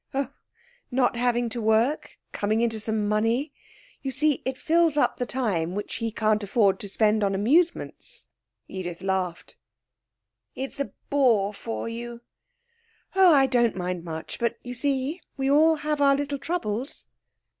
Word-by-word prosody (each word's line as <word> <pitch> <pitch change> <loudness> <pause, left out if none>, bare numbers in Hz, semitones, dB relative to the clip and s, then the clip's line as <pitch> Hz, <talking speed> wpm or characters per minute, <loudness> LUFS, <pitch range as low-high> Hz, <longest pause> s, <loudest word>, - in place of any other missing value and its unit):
'Oh, 275 -2 0 0.6
not 245 -1 +2
having 240 0 +1
to 235 +1 -3
work, 225 +7 +1
coming 215 +2 0
into 225 -2 0
some 215 -1 -1
money. 225 +7 +1 0.5
You 270 - -3
see, 290 +2 +2
it 260 0 -2
fills 325 +1 +2
up - - +2
the 245 - -2
time 190 -10 -1
which 205 - -4
he 230 -1 -2
can't 215 -1 +1
afford 200 -1 +2
to 200 - -5
spend 215 +1 +2
on 195 -1 +1
amusements.' 310 - +1 0.4
Edith 180 -2 -6
laughed. 190 -3 -2 1.0
'It's 270 +2 -5
a 280 - -2 0.2
bore 230 -8 +3
for 225 +3 -5
you....' 235 +1 -6 0.9
'Oh, 380 -2 +7
I 275 -3 +6
don't 240 -4 +2
mind 180 -2 -3
much; 160 -2 -6
but 235 - 0
you 245 - -6
see 275 +5 -1 0.2
we 270 0 +1
all 315 +3 +5
have 300 -1 -2
our 275 -1 +5
little 285 0 -2
troubles.' 265 -7 -3
235 Hz, 155 wpm, -26 LUFS, 210-280 Hz, 1.0 s, Oh